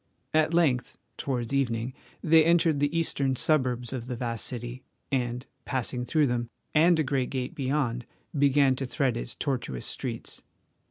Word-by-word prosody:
At 155 0 +3
length, 155 -8 +2 0.2
towards 125 -2 -2
evening, 125 -2 0 0.3
they 160 0 +6
entered 165 -2 +3
the 145 +3 +1
eastern 140 -5 +1
suburbs 125 -4 +1
of 125 -2 -5
the 125 - -3
vast 115 -2 -2
city 120 +1 -5 0.3
and, 125 -1 -1 0.2
passing 125 -1 -2
through 155 +3 +3
them 120 -2 -1 0.2
and 165 +2 +5
a 155 - +2
great 130 -2 0
gate 130 -2 -3
beyond, 130 -4 -1 0.3
began 140 -1 +4
to 135 - -3
thread 130 -1 0
its - - -4
tortuous 120 - -2
streets. - - -4
130 Hz, 155 wpm, -28 LUFS, 120-145 Hz, 0.3 s, they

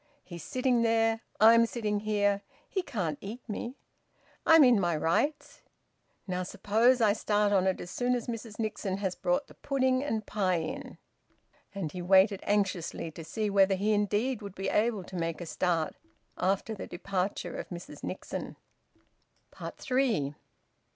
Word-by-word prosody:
He's 170 -2 -9
sitting 255 -3 +1
there. 225 0 +2 0.2
I'm 230 +2 +7
sitting 210 -3 -1
here. 205 -1 +1 0.3
He 380 - -1
can't 180 - -3
eat 225 +6 -8
me. 235 +4 -5 0.7
I'm 325 -1 +8
in 245 -5 +6
my 175 -4 +1
rights. 225 - 0 0.6
Now 185 -1 -2
suppose 220 +7 +2
I 210 -2 +5
start 210 -1 +1
on 190 -1 +3
it 190 - 0
as 175 - -7
soon 250 0 +1
as 240 - -3
Mrs 230 -2 -6
Nixon 210 -3 -2
has 195 -2 -1
brought 270 +7 0
the - - -16
pudding 260 -1 +1
and 220 -7 -2
pie 190 -4 0
in?" 260 +11 -5 0.8
And 175 -6 -3
he 180 - -6
waited 190 +2 +5
anxiously 190 -5 0
to 165 - -9
see 210 +7 -2
whether 195 -1 +4
he 205 +3 +1
indeed 210 +4 0
would 200 -2 -8
be 195 - -2
able 215 -2 +1
to 185 - -10
make 165 -2 -2
a 175 - -5
start 165 -1 0 0.4
after 195 +4 0
the 210 - -7
departure 190 +1 -3
of - - -6
Mrs 175 -1 -9
Nixon. - - -5 1.0
THREE. 240 - -1
205 Hz, 155 wpm, -30 LUFS, 185-235 Hz, 1.0 s, I'm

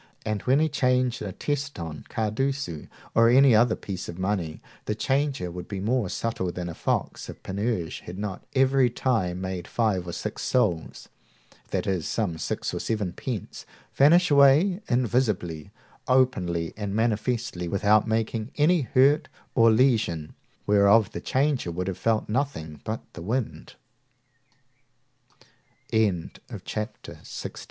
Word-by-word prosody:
And 110 -2 -1
when 135 +3 +5
he 160 - +3
changed 125 -4 +1
a 100 - -4
teston, 90 - -4
cardecu, 110 - -2 0.3
or 115 0 +5
any 130 +1 +6
other 110 +1 +4
piece 95 -2 -6
of 85 - -7
money, 95 -5 -2 0.3
the 105 - -1
changer 135 -6 0
had 90 0 -7
been 100 -1 -4
more 120 -4 +1
subtle 100 -5 -2
than 90 0 -5
a - - -5
fox - - -2
if - - -10
Panurge 100 -3 -2
had 90 +2 -9
not 100 -2 -4
at - - -33
every 135 -1 +4
time 110 -8 0
made 95 -2 -4
five 100 -6 0
or - - -4
six - - -5
sols 80 -3 0 0.6
(that - - -1
is, 90 -5 -1
some 90 -8 -2
six - - -3
or - - -2
seven 105 -6 -2
pence,) 115 0 -5 0.3
vanish 170 +5 +5
away 145 +8 +5
invisibly, 110 - 0 0.4
openly, 90 -11 +1
and 100 -1 -4
manifestly, 110 -4 -1
without 105 +4 +3
making 110 0 -1
any 160 +3 +4
hurt 135 +3 +3 0.2
or 115 -2 +5
lesion, 110 - +2 0.3
whereof 105 +1 +5
the - - -6
changer 135 - 0
should 90 +2 -3
have 95 - -2
felt 115 -1 +1
nothing 105 - -3
but 110 +1 -3
the 85 - -8
wind. 115 +6 -3 2.9
Chapter 105 +2 -5
2.XVII. - - -8
110 Hz, 140 wpm, -26 LUFS, 90-130 Hz, 2.9 s, any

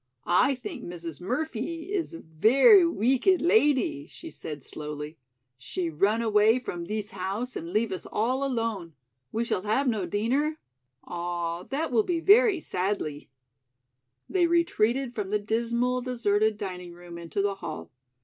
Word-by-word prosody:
"I 225 +10 +3
think 255 - -7
Mrs. 170 -3 -7
Murphee 315 - -3
is 355 -4 -2
a - - -9
very 270 - +6
week 255 - +1
ed 375 -2 +6
ladee," 295 - +2
she 330 - -10
said 150 -4 -8
slowly. 150 +2 -7 0.4
"She 165 +5 -3
run 205 +9 +2
away 215 +1 +4
from 175 -9 -5
thees 215 +1 -4
house 200 +6 -4
and 165 +1 -5
leave 215 +1 +1
us 185 - -5
all 255 +6 0
alone. 225 - -2 0.4
We 225 - 0
shall 185 - -1
have 220 +7 +1
no 215 -7 0
deener? 260 - 0 0.5
Ah, 175 -1 -3
that 285 +2 -2
will 230 -3 +4
be 335 +7 -1
very 410 +1 +5
sadlee." 180 - -3 1.0
They 360 -2 +2
retreated 270 -7 +1
from 205 -4 -3
the 210 - +2
dismal, 235 +4 0
deserted 220 -4 +1
dining 180 -3 -6
room 175 0 -10
into 170 +4 -2
the 200 0 +1
hall. 80 0 -6
220 Hz, 150 wpm, -27 LUFS, 175-270 Hz, 1.0 s, very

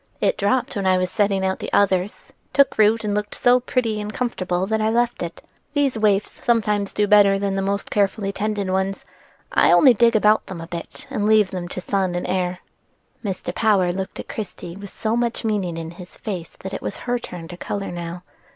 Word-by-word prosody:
"It - - +2
dropped 240 +6 0
when 195 -2 -1
I 185 0 +4
was 185 0 -1
setting 200 -3 +1
out 190 0 -1
the - - -5
others, 190 0 +1 0.2
took 280 -5 +3
root, 220 +1 +4
and 210 -1 -1
looked 210 0 -2
so 245 +1 +4
pretty 230 -4 -1
and 210 0 -5
comfortable 185 -7 -1
that 220 +2 0
I 215 - +2
left 240 +1 +1
it. 170 -1 -6 0.3
These 280 -3 +2
waifs 210 -2 0
sometimes 210 -4 +1
do 210 - +1
better 205 -1 +6
than 195 -1 -1
the 195 - 0
most 200 +1 -2
carefully 200 0 +1
tended 205 -1 -2
ones: 190 +1 -1 0.5
I - - +4
only 265 -4 +7
dig 235 0 +4
round 215 +1 +6
them 185 -3 -7
a 165 - -6
bit 170 0 -8
and 210 0 0
leave 215 -3 +4
them 180 -2 -4
to 185 - -6
sun 190 -2 0
and 175 - -2
air." 180 -1 -1 0.6
Mr. 195 -4 -3
Power 200 -5 +3
looked 190 +1 -5
at - - -6
Christie 180 -5 -6
with 200 0 -9
so 220 +3 -2
much 235 -1 -1
meaning 195 -6 -1
in 165 0 -5
his 175 +1 -12
face 185 -6 -6
that 190 +1 -6
it - - -4
was - - -4
her 245 0 0
turn 175 -7 -8
to 175 - -7
color 200 +2 -4
now. 175 0 -6
200 Hz, 215 wpm, -22 LUFS, 185-220 Hz, 0.6 s, only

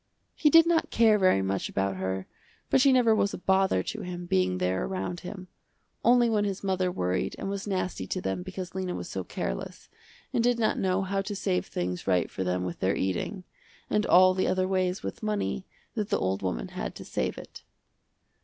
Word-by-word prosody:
He 300 - +3
did 330 +2 +8
not 335 -1 +2
care 220 -2 +4
very 185 - +4
much 95 0 -1
about 95 -1 -1
her 95 0 -2 0.5
but - - +5
she 275 - +6
never 245 -3 +5
was 200 -2 +1
a - - -6
bother 190 - +2
to - - -5
him 175 -1 -6
being 90 - +1
there 90 +1 0
around 185 -2 -3
him, 185 0 -8 0.6
only 240 0 +5
when 215 -2 +2
his 200 -1 -3
mother 185 -2 0
worried 90 - -1
and - - -4
was 200 0 -4
nasty 185 - -2
to - - -2
them 95 - -2
because 185 0 -6
Lena 185 -1 -3
was 90 - -5
so 95 - -4
careless, - - -5 0.4
and 230 - +2
did 245 0 +3
not 225 -2 +1
know 190 0 +1
how 195 +1 -1
to 205 +1 -5
save 190 -2 -1
things 90 0 -3
right 90 -3 +2
for 95 - -3
them 90 0 -1
with 90 -2 -5
their 95 +1 +1
eating, 95 - -2 0.5
and 210 - +2
all 185 +1 +7
the 185 - 0
other 185 0 +1
ways 185 +1 0
with - - -5
money, 210 -3 -2 0.3
that 210 -4 -2
the - - +2
old 95 +1 -1
woman - - -3
had - - -5
to - - -9
save - - -2
it. - - -10
185 Hz, 210 wpm, -28 LUFS, -, 0.6 s, did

